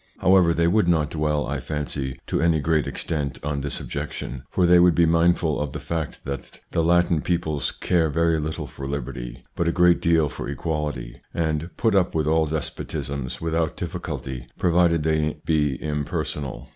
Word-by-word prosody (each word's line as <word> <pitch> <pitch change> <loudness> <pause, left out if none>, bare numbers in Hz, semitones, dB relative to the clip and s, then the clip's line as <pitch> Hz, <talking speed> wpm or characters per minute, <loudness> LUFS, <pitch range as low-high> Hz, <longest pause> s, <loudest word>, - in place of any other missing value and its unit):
However, 95 -2 +5
they 85 0 +2
would 95 +2 +3
not 80 -4 +2
dwell, 75 -1 0
I - - -2
fancy, 70 -3 -4
to - - -1
any 85 -1 +3
great 80 0 +1
extent 70 -6 -3
on 75 -1 -2
this 70 0 -2
objection, 70 -3 -5
for 90 - +2
they 90 0 +7
would 90 -2 +5
be 85 - +5
mindful 85 -1 +2
of 75 -3 -3
the - - -4
fact 80 -3 -4
that 70 0 -6
the 85 - +1
Latin 85 -1 +3
peoples 80 -4 0
care 85 -3 +1
very 80 +2 +2
little 80 +1 -3
for 70 - -7
liberty, 60 -3 -5
but 85 - 0
a - - +3
great 90 0 +4
deal 80 -2 +3
for 70 - -6
equality, 75 -4 -3
and 80 0 -1
put 115 -2 +2
up 95 -3 +2
with 80 -2 +1
all 80 +1 +3
despotisms 70 -3 -4
without 80 -1 -1
difficulty 65 -2 -5
provided 85 -2 +3
they 75 -1 0
be 75 -4 +2
im 75 0 -2
personal. 65 -4 -4
80 Hz, 180 wpm, -24 LUFS, 70-85 Hz, -, they